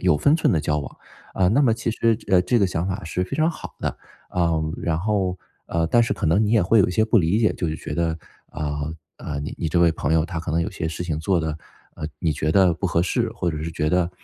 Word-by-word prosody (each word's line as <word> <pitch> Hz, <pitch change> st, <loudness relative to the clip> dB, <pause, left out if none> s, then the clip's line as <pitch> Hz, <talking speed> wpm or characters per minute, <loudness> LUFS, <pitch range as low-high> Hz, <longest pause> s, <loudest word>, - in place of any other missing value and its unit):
有 75 Hz, -, +3 dB
分 145 Hz, -, +4 dB
寸 165 Hz, -, +2 dB
地 80 Hz, -, +2 dB
交 75 Hz, +1 st, 0 dB
往。 70 Hz, -, -7 dB, 0.4 s
啊， 95 Hz, -, +3 dB
那 125 Hz, +8 st, +3 dB
么 115 Hz, -4 st, +4 dB
其 115 Hz, 0 st, -2 dB
实 115 Hz, 0 st, +2 dB
这 105 Hz, -, -9 dB
呃， 90 Hz, -, +6 dB
这 120 Hz, +5 st, +2 dB
个 100 Hz, -, +3 dB
想 85 Hz, +1 st, -2 dB
法 95 Hz, 0 st, -4 dB
是 90 Hz, +3 st, -2 dB
非 135 Hz, +9 st, -4 dB
常 155 Hz, +1 st, +3 dB
好 160 Hz, -, -9 dB
的。 -, -, -2 dB, 0.3 s
呃， 80 Hz, -3 st, 0 dB
然 80 Hz, -1 st, -1 dB
后 95 Hz, -2 st, 0 dB, 0.3 s
呃， 85 Hz, -1 st, 0 dB
但 120 Hz, +7 st, +4 dB
是 115 Hz, -, 0 dB
可 -, -, -2 dB
能 90 Hz, +7 st, +3 dB
你 105 Hz, -, 0 dB
也 110 Hz, -4 st, +4 dB
会 110 Hz, +6 st, +4 dB
有 -, -, +4 dB
一 -, -, -2 dB
些 110 Hz, +4 st, +2 dB
不 115 Hz, 0 st, +3 dB
理 85 Hz, +4 st, +2 dB
解。 110 Hz, -2 st, +3 dB
就 85 Hz, -, -2 dB
是 80 Hz, -, -3 dB
觉 75 Hz, -, -6 dB
得， 80 Hz, 0 st, -1 dB, 0.3 s
啊， 75 Hz, 0 st, -3 dB, 0.2 s
呃， 75 Hz, -2 st, -5 dB
你 75 Hz, -, -5 dB
你 80 Hz, -, -1 dB
这 85 Hz, -, +1 dB
位 85 Hz, -1 st, +5 dB
朋 80 Hz, -1 st, -2 dB
友 80 Hz, -1 st, +3 dB
他 85 Hz, -3 st, -4 dB
可 85 Hz, -, -5 dB
能 80 Hz, +2 st, +1 dB
有 85 Hz, -, -2 dB
些 80 Hz, -, -4 dB
事 80 Hz, +2 st, -4 dB
情 80 Hz, -3 st, -2 dB
做 85 Hz, +2 st, +1 dB
的， 80 Hz, -1 st, -3 dB, 0.4 s
呃， 75 Hz, -, -5 dB
你 80 Hz, -, 0 dB
觉 75 Hz, +2 st, -1 dB
得 95 Hz, -4 st, +4 dB
不 95 Hz, -, -2 dB
合 85 Hz, 0 st, +1 dB
适， 90 Hz, -, 0 dB
或 85 Hz, -, -1 dB
者 75 Hz, -1 st, -5 dB
是 80 Hz, -, -3 dB
觉 75 Hz, -1 st, -1 dB
得， 90 Hz, +1 st, +1 dB
85 Hz, 305 characters per minute, -23 LUFS, 80-100 Hz, 0.4 s, 呃